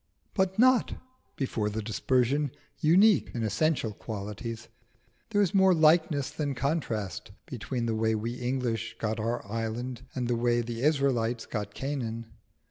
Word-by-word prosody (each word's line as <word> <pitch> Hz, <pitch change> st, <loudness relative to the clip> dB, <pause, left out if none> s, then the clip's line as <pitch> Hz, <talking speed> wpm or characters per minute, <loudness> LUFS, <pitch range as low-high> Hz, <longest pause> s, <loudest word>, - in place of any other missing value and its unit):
But 190 Hz, -1 st, +1 dB
not, 255 Hz, +1 st, +4 dB, 0.4 s
before 115 Hz, -6 st, -1 dB
the 110 Hz, +1 st, -3 dB
dispersion, 130 Hz, +6 st, +1 dB, 0.3 s
unique 190 Hz, +6 st, +5 dB
in 115 Hz, -, -1 dB
essential 120 Hz, 0 st, +1 dB
qualities. 110 Hz, +2 st, -6 dB, 0.6 s
There 205 Hz, 0 st, +3 dB
is 180 Hz, -, 0 dB
more 190 Hz, -2 st, +5 dB
likeness 155 Hz, -3 st, +3 dB
than 145 Hz, -3 st, -2 dB
contrast 120 Hz, -, -2 dB, 0.2 s
between 125 Hz, -4 st, -4 dB
the 115 Hz, -, 0 dB
way 110 Hz, 0 st, +1 dB
we 115 Hz, +2 st, -2 dB
English 125 Hz, -2 st, -2 dB
got 110 Hz, 0 st, -2 dB
our 115 Hz, +2 st, -2 dB
island 115 Hz, +3 st, -4 dB
and 125 Hz, -2 st, -1 dB
the 120 Hz, -, +1 dB
way 120 Hz, 0 st, +2 dB
the 115 Hz, 0 st, -5 dB
Israelites 130 Hz, -6 st, +1 dB
got 105 Hz, -2 st, -5 dB
Canaan. 120 Hz, -5 st, -3 dB
120 Hz, 140 wpm, -29 LUFS, 115-145 Hz, 0.6 s, unique